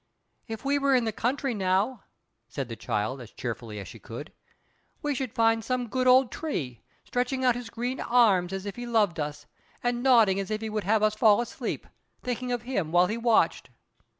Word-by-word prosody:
"If 225 Hz, +2 st, -7 dB
we 285 Hz, +1 st, +2 dB
were 275 Hz, -1 st, +3 dB
in 250 Hz, -, +3 dB
the 220 Hz, -, 0 dB
country 255 Hz, +4 st, -1 dB
now," 195 Hz, +4 st, 0 dB, 0.4 s
said 135 Hz, -4 st, -4 dB
the 115 Hz, -, -5 dB
child, 110 Hz, +4 st, -2 dB
as 115 Hz, -, -10 dB
cheerfully 115 Hz, -2 st, -6 dB
as 100 Hz, -, -7 dB
she -, -, -11 dB
could, -, -, -9 dB, 0.7 s
"we 295 Hz, -1 st, 0 dB
should 260 Hz, -3 st, -3 dB
find 225 Hz, 0 st, +3 dB
some 250 Hz, -1 st, -2 dB
good 255 Hz, +2 st, 0 dB
old 255 Hz, 0 st, +6 dB
tree, 130 Hz, -, -4 dB, 0.2 s
stretching 255 Hz, +1 st, -1 dB
out 250 Hz, -, +5 dB
his 245 Hz, -1 st, -6 dB
green 245 Hz, +3 st, -3 dB
arms 205 Hz, -7 st, +3 dB
as 195 Hz, 0 st, -4 dB
if 200 Hz, +1 st, -6 dB
he 240 Hz, 0 st, -5 dB
loved 210 Hz, -8 st, +2 dB
us, 150 Hz, 0 st, -4 dB, 0.4 s
and 245 Hz, 0 st, 0 dB
nodding 230 Hz, -7 st, +5 dB
as 195 Hz, -, -4 dB
if 215 Hz, 0 st, -2 dB
he 220 Hz, -1 st, -4 dB
would 215 Hz, -2 st, -2 dB
have 215 Hz, +1 st, +2 dB
us 215 Hz, 0 st, +3 dB
fall 215 Hz, -1 st, +5 dB
asleep; 240 Hz, -, -4 dB, 0.4 s
thinking 250 Hz, 0 st, -3 dB
of 240 Hz, -2 st, -2 dB
him 195 Hz, -11 st, -2 dB
while 175 Hz, +1 st, +5 dB
he 210 Hz, -, -2 dB
watched. 230 Hz, -1 st, +2 dB
225 Hz, 205 wpm, -27 LUFS, 185-250 Hz, 0.7 s, old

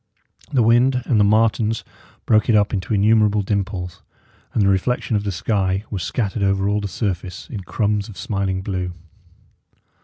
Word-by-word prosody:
The 130 Hz, -5 st, +3 dB
wind 125 Hz, +3 st, +3 dB
and 115 Hz, -, +2 dB
the -, -, +5 dB
martens 110 Hz, +1 st, +2 dB, 0.4 s
broke 110 Hz, 0 st, +3 dB
it 115 Hz, -, +5 dB
up 105 Hz, +1 st, +2 dB
into 100 Hz, +2 st, -1 dB
innumerable 105 Hz, 0 st, +3 dB
dimples; 95 Hz, -3 st, -3 dB, 0.5 s
and 110 Hz, -, +1 dB
the -, -, +3 dB
reflection 105 Hz, +5 st, +1 dB
of 105 Hz, -, 0 dB
the 100 Hz, -, -1 dB
sky 95 Hz, +1 st, -1 dB
was 100 Hz, -4 st, -3 dB
scattered 105 Hz, +3 st, -2 dB
over 95 Hz, 0 st, +1 dB
all 105 Hz, +1 st, +1 dB
the 100 Hz, -, -3 dB
surface 95 Hz, -1 st, -4 dB
in 110 Hz, -, -4 dB
crumbs 105 Hz, +2 st, -1 dB
of 105 Hz, -, -11 dB
smiling 95 Hz, -2 st, -2 dB
blue. 90 Hz, -2 st, -3 dB
105 Hz, 165 wpm, -21 LUFS, 95-110 Hz, 0.5 s, the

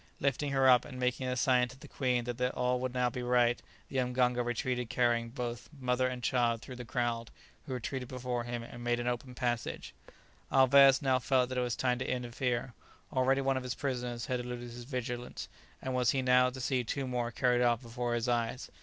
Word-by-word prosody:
Lifting 140 Hz, +1 st, 0 dB
her 135 Hz, -1 st, +4 dB
up, 125 Hz, -2 st, +7 dB
and 130 Hz, -3 st, -9 dB
making 125 Hz, +1 st, 0 dB
a 125 Hz, -, -1 dB
sign 125 Hz, 0 st, +3 dB
to 130 Hz, +2 st, -13 dB
the -, -, -11 dB
queen 125 Hz, -3 st, 0 dB
that 120 Hz, +1 st, -5 dB
all 125 Hz, 0 st, +1 dB
would 130 Hz, 0 st, -2 dB
now 125 Hz, 0 st, +1 dB
be 125 Hz, -, -4 dB
right, 120 Hz, -1 st, +2 dB, 0.3 s
the 135 Hz, -, -4 dB
mganga 125 Hz, -1 st, +2 dB
retreated 120 Hz, 0 st, -2 dB
carrying 120 Hz, -1 st, +1 dB
both 120 Hz, -1 st, -5 dB
mother 125 Hz, 0 st, +1 dB
and 125 Hz, -1 st, -5 dB
child 120 Hz, -3 st, +2 dB
through 125 Hz, +2 st, -9 dB
the 125 Hz, -, -6 dB
crowd, 115 Hz, -1 st, -1 dB, 0.4 s
who 130 Hz, -, -3 dB
retreated 125 Hz, +1 st, -4 dB
before 125 Hz, -1 st, -3 dB
him 120 Hz, 0 st, -4 dB
and 120 Hz, +1 st, -9 dB
made 120 Hz, 0 st, +1 dB
an 120 Hz, -, -3 dB
open 125 Hz, +1 st, -3 dB
passage. 120 Hz, -2 st, -2 dB, 0.6 s
Alvez 135 Hz, +1 st, +6 dB
now 130 Hz, -1 st, +3 dB
felt 130 Hz, 0 st, +2 dB
that 130 Hz, -, -3 dB
it -, -, +2 dB
was 120 Hz, -1 st, -1 dB
time 125 Hz, -1 st, 0 dB
to -, -, -3 dB
interfere. 125 Hz, 0 st, -2 dB, 0.4 s
Already 135 Hz, +1 st, +3 dB
one 135 Hz, 0 st, +1 dB
of -, -, -2 dB
his 125 Hz, -1 st, -4 dB
prisoners 125 Hz, -4 st, -3 dB
had 125 Hz, -1 st, -1 dB
eluded 120 Hz, 0 st, -6 dB
his 120 Hz, 0 st, -9 dB
vigilance, 125 Hz, -2 st, -4 dB, 0.4 s
and 130 Hz, -, -2 dB
was 125 Hz, -1 st, +2 dB
he 130 Hz, -1 st, +1 dB
now 125 Hz, 0 st, +5 dB
to 130 Hz, +1 st, -8 dB
see 130 Hz, 0 st, 0 dB
two 135 Hz, +4 st, -2 dB
more 125 Hz, -2 st, -1 dB
carried 125 Hz, 0 st, +2 dB
off 120 Hz, 0 st, +2 dB
before 120 Hz, 0 st, -2 dB
his 120 Hz, +1 st, -1 dB
eyes? 120 Hz, 0 st, -1 dB
125 Hz, 215 wpm, -32 LUFS, 120-130 Hz, 0.6 s, up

